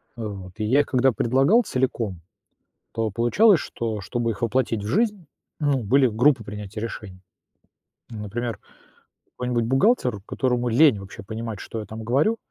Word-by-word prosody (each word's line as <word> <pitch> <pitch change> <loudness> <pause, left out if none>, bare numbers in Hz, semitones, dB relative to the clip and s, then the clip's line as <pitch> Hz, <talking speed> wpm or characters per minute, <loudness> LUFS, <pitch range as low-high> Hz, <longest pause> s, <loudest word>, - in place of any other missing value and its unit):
вот. 100 -5 -7
И 110 - -3
я 135 +6 +4
когда 130 +1 +2
предлагал 135 - +3
целиком, 115 - -2 0.7
то 115 -1 -1
получалось, 140 - +4
что 110 -2 -4
чтобы 115 +4 -2
их 105 - -6
воплотить 115 -2 0
в - - -5
жизнь, 205 - 0 0.3
ну, 145 -4 +1
были 130 +6 +4
группы 120 +2 +2
принятия 105 +1 -7
решений. 105 -4 -7 0.9
Например, 115 +2 -4 0.8
какой-нибудь 125 -2 -1
бухгалтер, 130 - +2
которому 125 -2 0
лень 125 -2 +5
вообще 100 0 -10
понимать, 110 0 -6
что 115 - -6
я 105 - -6
там 110 +2 -8
говорю, 140 - +2
115 Hz, 145 wpm, -24 LUFS, 110-135 Hz, 0.9 s, лень